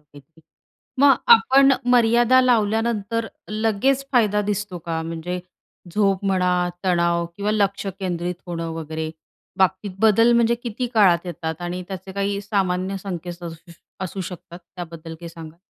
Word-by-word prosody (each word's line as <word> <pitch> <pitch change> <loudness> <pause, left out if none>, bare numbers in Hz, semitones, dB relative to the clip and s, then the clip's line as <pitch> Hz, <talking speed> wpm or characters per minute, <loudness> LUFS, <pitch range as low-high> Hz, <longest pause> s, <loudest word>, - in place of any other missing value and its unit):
काहीते. 150 +2 -19 0.6
मग 280 0 +7 0.2
आपण 275 -11 +5 0.2
मर्यादा 240 +2 +5
लावल्यानंतर 225 -2 +1 0.4
लगेच 260 +6 +2
फायदा 210 -5 +3
दिसतो 205 -3 -3
का? 165 -1 -1
म्हणजे 165 +2 -4 0.5
झोप 200 -2 +1
म्हणा, 180 -1 +2 0.3
तणाव 170 -2 +2
किंवा 205 +1 -1
लक्ष 200 -1 0
केंद्रित 180 -1 -2
होणं 165 -1 -4
वगैरे 160 0 -4 0.5
बाबतीत 190 +2 +1
बदल 225 +2 +5
म्हणजे 235 0 +3
किती 240 +1 -3
काळात 185 -5 +4
येतात? 160 -1 -4
आणि 175 +1 -4
त्याचे 190 0 -7
काही 200 +1 -1
सामान्य 195 -2 -1
संकेत 175 -1 -6
असू 165 +1 -9 0.3
असू 190 +2 -5
शकतात 175 -1 -10
त्याबद्दल 170 -2 -9
काही 170 +1 -9
सांगा? 165 -1 -11
190 Hz, 135 wpm, -22 LUFS, 170-215 Hz, 0.6 s, मग